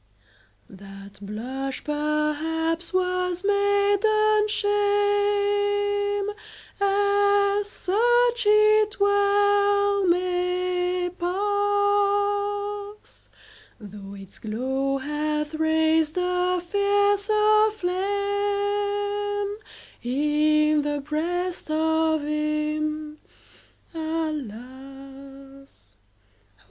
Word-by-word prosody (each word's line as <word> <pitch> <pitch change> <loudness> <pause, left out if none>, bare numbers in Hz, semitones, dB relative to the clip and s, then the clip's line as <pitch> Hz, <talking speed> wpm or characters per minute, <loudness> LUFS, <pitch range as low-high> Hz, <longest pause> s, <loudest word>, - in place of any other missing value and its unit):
That 195 +1 -13
blush, 255 +6 -5
perhaps, 305 +3 -2
was 365 -1 -1
maiden 410 +1 +2
shame 410 0 +1 0.5
As 405 0 +2
such 475 +4 +1
it 425 0 +4
well 405 0 +2
may 360 0 0
pass 410 +1 -1 0.5
Though 200 -1 -10
its 195 -1 -13
glow 265 +5 -2
hath 300 +2 -3
raised 315 0 +1
a 360 0 0
fiercer 410 +3 +2
flame 405 +1 -2 0.4
In 300 +3 +2
the 290 0 -2
breast 345 +5 -3
of 320 0 +1
him, 305 0 -2 0.7
alas! 275 -2 -8
365 Hz, 60 wpm, -24 LUFS, 300-410 Hz, 0.7 s, it